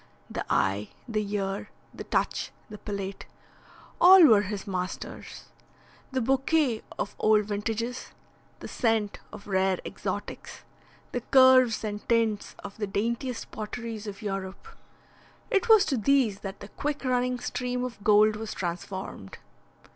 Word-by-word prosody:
The - - -3
eye, 100 +2 +1 0.2
the 215 -2 -1
ear, 195 -1 -3 0.2
the - - -8
touch, - - -1 0.2
the 210 - -8
palate 200 -2 -5 0.7
all 370 0 +9
were 220 -7 +7
his 200 0 -5
masters. 185 -2 -5 0.7
The 260 0 0
bouquet 270 -1 +1 0.2
of 205 - -4
old 215 -1 +4
vintages, 225 +4 -3 0.5
the - - -6
scent 225 -4 0
of - - -10
rare 190 -1 +1
exotics, - - -6 0.5
the 245 - -2
curves 260 -3 +5
and 210 -1 -3
tints 225 -3 +1
of 200 0 -8
the 210 -2 -2
daintiest 235 +5 -2
potteries 220 0 -6
of 205 +2 -7
Europe 195 - -5 0.8
it 460 +1 +1
was 440 -3 +7
to 275 -4 0
these 235 -3 +2
that 195 -1 -7
the 200 - -9
quick 290 +3 -4
running 250 0 +1
stream 250 0 -3
of 240 -5 -6
gold 210 0 +5
was 220 0 -6
transformed. 175 - -5
215 Hz, 135 wpm, -27 LUFS, 200-250 Hz, 0.8 s, all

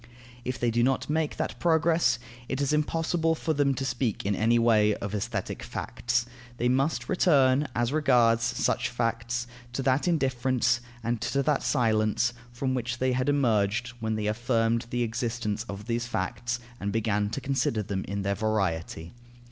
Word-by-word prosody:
If 125 0 -3
they 120 -1 +1
do 120 +1 +1
not 130 +3 +1
make 155 -1 0
that - - -3
progress, 160 -6 +3 0.3
it 130 - -2
is 140 +1 +1
impossible 165 +2 +1
for 160 0 -1
them 140 -2 +2
to 135 - -3
speak 125 -6 -1
in 100 - +1
any 115 +4 +3
way 110 -3 +4
of 100 - -5
aesthetic 105 - -3
facts. 120 0 -2 0.3
They 120 - +1
must 130 0 +1
return, 140 -5 +3
as 120 +3 0
regards 120 -6 +4
such 115 0 0
facts, 115 0 -1 0.3
to 135 - -2
that 130 +5 +2
indifference 130 -6 +1 0.2
and 115 0 -1
to 140 0 0
that 150 0 +1
silence 115 -1 +1 0.2
from 130 +2 -2
which 120 -1 -2
they 130 +1 +1
had 130 +2 0
emerged 115 -4 +2
when 110 -1 -1
they 105 -1 -2
affirmed 115 +1 +1
the 120 0 0
existence 115 -2 -2
of 100 +1 -6
these 120 0 -1
facts 120 +3 -2 0.2
and 100 - -2
began 105 -1 0
to 115 - -3
consider 135 -5 0
them 95 -1 -3
in 100 0 -3
their 100 0 +1
variety. 95 -5 -2
120 Hz, 170 wpm, -27 LUFS, 110-135 Hz, 0.3 s, way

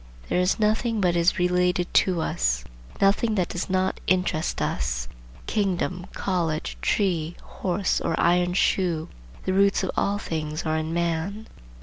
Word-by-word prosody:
There - - +2
is 180 +1 +2
nothing 220 +1 +1
but 180 -3 +2
is 170 +1 +3
related 180 0 +1
to 180 -3 0
us, 60 - 0 0.4
nothing 205 +3 +3
that 185 -3 0
does 180 - -4
not 185 0 0
interest 180 -4 +1
us,—kingdom, 65 - -2
college, 165 - -1
tree, 170 - 0
horse, 190 0 -1
or 165 - -1
iron 175 +1 +3
shoe,—the 160 - -1
roots 200 0 +3
of 190 - -1
all 200 +1 +1
things 155 -4 -4
are 155 0 +1
in 160 0 -2
man. 170 +5 -1
180 Hz, 135 wpm, -25 LUFS, 160-190 Hz, 0.4 s, is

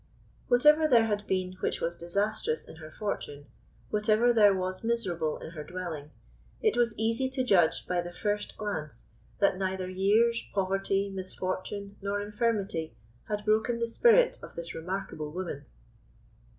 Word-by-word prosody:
Whatever 300 +5 +5
there 235 -6 +5
had 210 -1 -2
been 185 -1 -1
which - - -1
was 170 +1 -2
disastrous 200 0 -1
in - - -12
her 155 -1 -10
fortune, 145 -6 -5 0.5
whatever 215 +3 +3
there 210 -3 +6
was 185 +1 -3
miserable 180 -10 -1
in 160 - -9
her 155 -3 -7
dwelling, 170 -4 -6 0.5
it 435 -2 +2
was 235 -2 +1
easy 230 +4 0
to 260 0 -1
judge 180 -9 +3
by 180 -1 0
the 175 0 -7
first 205 +3 -2
glance 155 - 0 0.3
that 200 -2 +2
neither 190 -1 -2
years, 210 +5 +2
poverty, 195 +1 0
misfortune, 190 +1 -4
nor 200 +1 -1
infirmity 205 -6 -1 0.3
had 210 -1 -3
broken 220 +2 +2
the 235 - 0
spirit 480 - +4
of - - -11
this 170 0 -5
remarkable 165 -3 -4
woman. 165 -5 -5
200 Hz, 150 wpm, -29 LUFS, 180-220 Hz, 0.5 s, there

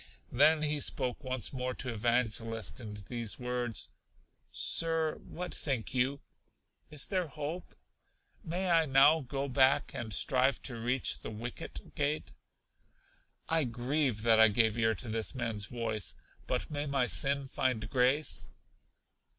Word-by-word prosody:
Then 150 +4 +4
he 150 0 0
spoke 130 -2 -1
once 130 -3 -3
more 125 -1 -3
to 125 -2 -4
Evangelist 115 0 0
in 105 -2 -7
these 115 -3 -3
words: 125 -2 -2 0.6
Sir, 165 -1 +2
what 180 +1 -7
think 135 -4 -2
you? 130 +2 0 0.7
Is 150 -2 -2
there 185 -3 -1
hope? 150 +6 -6 0.7
May 180 +1 -1
I 165 -2 +4
now 140 +4 +6
go 135 0 -3
back, 135 +1 +3
and 110 -2 -5
strive 130 +6 +3
to 120 - -2
reach 125 +2 0
The - - -7
Wicket 115 +3 -7
Gate? 150 +1 -2 1.1
I 165 -1 +2
grieve 125 -1 -1
that 115 -1 +6
I 110 - +9
gave 110 0 +3
ear 110 -1 +2
to 115 - -8
this 110 +3 -1
man's 115 -4 -2
voice; 110 -3 -3 0.3
but - - -2
may 145 0 -2
my 135 -2 +1
sin 140 +2 0
find 125 -4 -1
grace? 130 +5 +1
130 Hz, 140 wpm, -32 LUFS, 115-145 Hz, 1.1 s, I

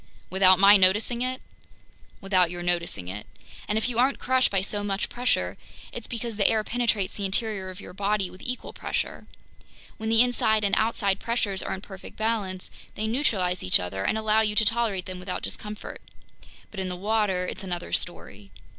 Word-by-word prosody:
"Without 185 0 +6
my 200 +2 +8
noticing 210 +6 +3
it?" 255 +1 -2 0.8
"Without 185 -3 +3
your 175 0 -5
noticing 170 - -1
it. 100 +3 -6 0.4
And 210 - 0
if 220 - +1
you 240 -2 -1
aren't 265 +3 +3
crushed 260 0 +2
by 195 -2 +1
so 205 +1 -3
much 200 0 -2
pressure, 250 +1 0 0.3
it's - - -7
because 230 -2 -5
the 200 - +4
air 220 -1 +2
penetrates 220 -5 0
the 200 - -2
interior 195 -1 -1
of 185 0 -9
your - - -10
body 200 0 0
with 185 - -13
equal 250 0 -4
pressure. - - -3 0.7
When 220 0 -3
the 225 +1 +6
inside 220 -3 +2
and 200 - +1
outside 205 -3 +1
pressures 210 -5 -1
are - - -3
in 190 - -9
perfect 190 -2 -11
balance, 210 -4 -1 0.2
they 215 - -2
neutralize 215 -7 +1
each 90 - +4
other 95 +2 -4
and 220 - +1
allow 220 0 +3
you 210 -1 0
to 220 0 +4
tolerate 220 -4 +1
them 185 -1 -6
without 180 0 -5
discomfort. 210 0 -6 0.7
But 210 - -7
in 190 -1 -2
the 180 - -3
water 200 -2 +1
it's 190 - -6
another 175 -2 -4
story." 100 - -3
205 Hz, 190 wpm, -26 LUFS, 185-220 Hz, 0.8 s, my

